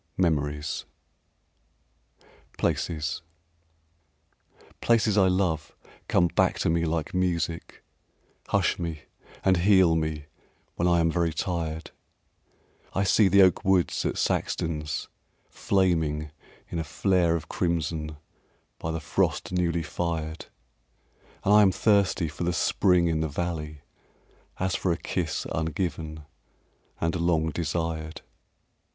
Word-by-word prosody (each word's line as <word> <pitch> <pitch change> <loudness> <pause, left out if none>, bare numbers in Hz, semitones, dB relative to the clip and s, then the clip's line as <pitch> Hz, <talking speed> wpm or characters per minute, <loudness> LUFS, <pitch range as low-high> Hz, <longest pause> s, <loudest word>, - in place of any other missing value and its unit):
Memories 75 -4 0 1.3
II - - -28 0.3
Places 75 -3 -1 1.6
Places 110 -3 +3
I 95 -3 +5
love 90 -5 0 0.3
come 90 - +3
back 85 - +2
to - - +1
me 85 0 +1
like 80 -1 -2
music, 85 -2 -2 0.6
Hush - - +1
me 85 -3 -4 0.4
and 95 -1 +4
heal 95 -2 +5
me 80 -2 -2 0.5
when 85 - 0
I 85 -1 +4
am 80 0 +2
very 85 -1 +1
tired; 80 -2 -3 1.0
I 95 - +2
see 100 +1 +4
the 100 +1 +6
oak 95 -3 +3
woods 95 -2 +2
at - - -1
Saxton's 75 -2 -1 0.4
flaming 80 -6 0 0.4
In 85 - -2
a - - -1
flare 85 +1 +1
of 80 - -4
crimson 80 -3 -2 0.6
by 80 - -4
the 80 0 -2
frost 75 - -1
newly 85 -2 0
fired; 80 0 -3 1.0
And 100 - +4
I 105 - +8
am 100 -2 +5
thirsty 100 -4 +2
for 75 +3 -6
the 85 +1 0
spring 90 +1 +3
in 80 -2 +1
the 80 0 -1
valley 75 -2 -4 0.8
As 95 0 0
for 95 -2 0
a 85 - 0
kiss 85 -1 -3
ungiven 80 -1 -3 0.7
and 80 +1 0
long 80 -2 +1
desired. 80 0 -3
85 Hz, 120 wpm, -26 LUFS, 80-90 Hz, 1.6 s, I